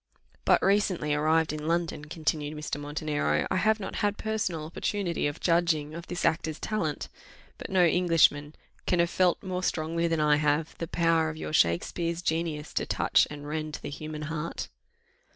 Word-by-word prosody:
"But - - +4
recently 190 -6 +2
arrived 155 +1 +2
in 155 0 -5
London," 165 -3 -1
continued 155 -1 -2
Mr. 150 -1 -4
Montenero, 150 0 -1
"I - - +2
have 215 +3 +3
not 195 - -5
had 205 -1 0
personal 200 -8 -2
opportunity 175 0 -1
of 145 - -5
judging 165 -3 +1
of 170 +1 -8
this 175 - -3
actor's 160 -1 0
talent; 165 -9 -2 0.5
but - - -7
no 185 -2 +4
Englishman 165 -4 +3 0.3
can 180 - +2
have 170 0 +2
felt 180 0 +2
more 185 -1 -3
strongly 165 -1 0
than 165 -1 0
I 150 -1 +4
have, 150 +1 0
the 165 - -3
power 165 -1 +2
of 155 - -7
your 155 - -5
Shakspeare's 165 - +1
genius 160 -2 -2
to - - -1
touch - - +3
and 145 0 -8
rend 155 0 -3
the - - -5
human 155 +1 -6
heart." 155 +1 -4
160 Hz, 170 wpm, -28 LUFS, 150-175 Hz, 0.5 s, But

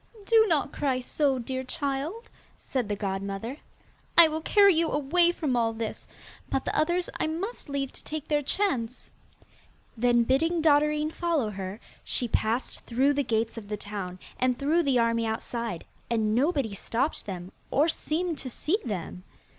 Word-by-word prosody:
'Do 445 +1 +6
not 295 -3 +2
cry 265 -3 0
so, 270 +1 +1
dear 260 +2 -3
child,' 285 - -3 0.3
said 250 -6 -3
the 205 - 0
godmother. 200 +5 -3 0.6
'I 335 -2 +10
will 315 +1 -3
carry 400 +3 +6
you 325 0 +2
away 340 +5 +3
from 300 -7 -1
all 230 -1 +1
this, 225 -1 -5 0.4
but 270 - -1
the - - -2
others 345 +4 +1
I - - +1
must 340 +4 -4
leave 275 -1 -2
to - - -14
take 310 -1 -5
their 295 -1 +2
chance.' 265 - -1 0.8
Then, 240 0 +3
bidding 325 +8 +2
Dotterine 300 0 +3
follow 320 -11 0
her, 195 +1 -6 0.2
she 245 - 0
passed 230 +2 -1
through 265 +4 +3
the 285 - +1
gates 225 -1 -1
of 205 - -13
the 210 0 -3
town, 200 -3 -6 0.2
and 255 -1 +2
through 305 +5 +2
the 275 -5 +2
army 230 -1 +2
outside, 225 -3 -3 0.2
and 220 -2 +1
nobody 270 - +1
stopped 235 +8 -2
them, 185 -1 -6 0.2
or 295 +4 +3
seemed 330 0 -2
to 260 - -5
see 325 - -1
them. 185 -4 -5
265 Hz, 165 wpm, -27 LUFS, 225-315 Hz, 0.8 s, I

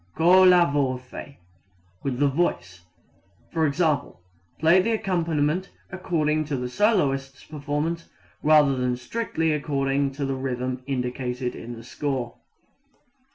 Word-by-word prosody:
Colla 180 +1 +6
voce 130 0 -3 0.7
with 135 -3 -2
the 145 +2 +3
voice: 115 - -2 0.7
i.e., 155 -2 +1 0.5
play 165 +4 +5
the 225 +4 0
accompaniment 170 -4 0 0.2
according 155 -5 0
to 145 -2 -2
the 125 0 -3
soloist's 135 - +1
performance 150 +3 -3 0.3
rather 150 -3 +5
than 125 -1 -1
strictly 160 - -2
according 140 -2 0
to 140 0 -3
the 135 - -1
rhythm 130 -1 -3
indicated 125 -1 -3
in 120 +1 -8
the 115 - -11
score. 130 -1 -4
145 Hz, 110 wpm, -25 LUFS, 130-165 Hz, 0.7 s, Colla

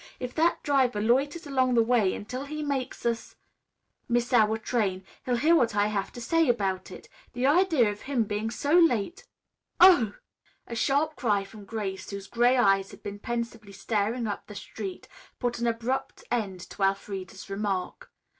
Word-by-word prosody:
If 250 -1 -5
that 335 +2 +1
driver 260 -6 +2
loiters 275 +9 +1
along 260 -3 +1
the 230 - +5
way 225 -5 +2
until 250 +6 -6
he 305 +1 -5
makes 275 -5 -3
us 230 -1 -2 0.7
miss 240 +1 0
our 220 -2 +4
train, 205 -5 -1 0.2
he'll 250 - +2
hear 315 +7 +4
what 230 -8 +2
I 205 0 +3
have 200 -1 -2
to - - -8
say 330 +3 +2
about 195 -5 0
it. - - -11 0.3
The 245 +1 -1
idea 300 - +4
of 205 - -9
him 265 -4 0
being 210 +1 -2
so 285 +6 -2
late 335 - +3 0.3
" - - -52
"Oh!" 345 - +7 0.5
A - - -8
sharp 290 +5 +1
cry 205 -5 +1
from 200 +1 -12
Grace, 195 -3 -5
whose 200 -1 -6
gray 240 +4 +3
eyes 195 -4 +3
had - - -14
been 205 0 -6
pensively 230 -3 -5
staring 220 +4 -1
up 205 -2 -4
the 210 - -10
street, 195 -1 -7 0.3
put 240 -1 -2
an 235 - 0
abrupt 235 +3 -2
end 200 -6 -2
to - - -10
Elfreda's 195 -1 -2
remark. 195 -2 -3
230 Hz, 175 wpm, -27 LUFS, 205-260 Hz, 0.7 s, Oh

